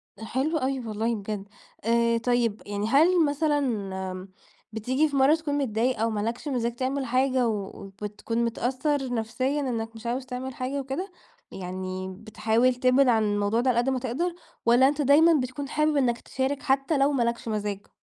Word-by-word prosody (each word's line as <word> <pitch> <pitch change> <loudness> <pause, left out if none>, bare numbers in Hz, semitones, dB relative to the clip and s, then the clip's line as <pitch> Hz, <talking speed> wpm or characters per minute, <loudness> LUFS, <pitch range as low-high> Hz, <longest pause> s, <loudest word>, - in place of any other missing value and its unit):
ده 220 - -9
حلو 280 +8 0
أوي 265 -1 -1
والله 225 0 -2
بجد، 205 -1 -5 0.4
آآ، 235 +1 +2
طيّب 235 -2 0
يعني 205 +1 -2
هل 325 +6 +5
مثلًا 290 0 +1
امم، 190 -6 -3 0.4
بتيجي 260 +8 +1
في 280 - -4
مَرّة 275 +4 +5
تكون 295 -3 -2
متضايق 245 -2 0
أو 225 +1 +2
مالكش 225 +6 -3
مزاج 240 -4 -1
تعمل 265 +2 -1
حاجة 255 0 +2
و 205 -2 -4
وبتكون 210 +4 -3
متأثر 260 +3 -1
نفسيًا 255 +6 -1
إنك 230 -4 -3
مش 225 +1 -11
عاوز 250 +2 -2
تعمل 255 0 -5
حاجة 260 +3 -3
وكده؟ 275 +9 -4 0.4
يعني 185 0 -5
بتحاول 220 +3 +1
تبعد 255 +2 +4
عن 225 -2 +4
الموضوع 205 +2 +1
ده 255 - +1
على 240 - +2
قدّ 245 - +1
ما 260 -1 0
تقدر، 315 +9 -2 0.3
والّا 245 +3 +6
أنت 295 +1 0
دايمًا 300 +5 +6
بتكون 265 +2 -5
حابب 305 0 +1
إنك 245 -3 +2
تشارك 270 +2 -2
حتّى 270 +3 +1
لو 275 +1 +3
ما 260 -4 +1
لكش 235 0 -2
مزاج؟ 205 -2 -3
245 Hz, 175 wpm, -26 LUFS, 220-275 Hz, 0.4 s, والّا